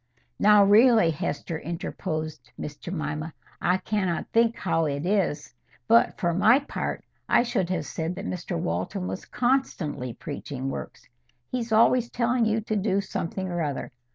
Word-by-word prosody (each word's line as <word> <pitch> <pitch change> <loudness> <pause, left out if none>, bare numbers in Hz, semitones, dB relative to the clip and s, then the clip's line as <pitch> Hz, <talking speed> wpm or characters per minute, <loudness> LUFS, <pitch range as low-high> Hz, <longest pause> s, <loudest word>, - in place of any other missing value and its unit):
"Now, 210 0 +7
really, 220 -2 +6
Hester," 155 +1 -3
interposed 160 -2 -5
Miss 150 - -6
Jemima, 155 -1 -4 0.3
"I 180 +1 +3
cannot 190 -4 -1
think 230 0 +3
how 165 -3 0
it 145 +1 -2
is, 175 -8 0 0.3
but, 115 - +4
for 170 -1 +1
my 220 +8 +5
part, 285 - -4 0.2
I - - +5
should 200 -7 -1
have 170 -5 -1
said 165 +4 -3
that - - -6
Mr 180 0 -3
Walton 180 +2 -2
was - - -5
constantly 175 - -1
preaching 135 -2 -5
works. - - -8 0.4
He's 240 -2 -3
always 235 +2 +4
telling 235 0 +1
you 220 0 +1
to 215 0 -2
do 200 -1 +1
something 190 -1 -3
or 175 -1 -2
other. 145 -3 -3
185 Hz, 155 wpm, -26 LUFS, 160-220 Hz, 0.4 s, Now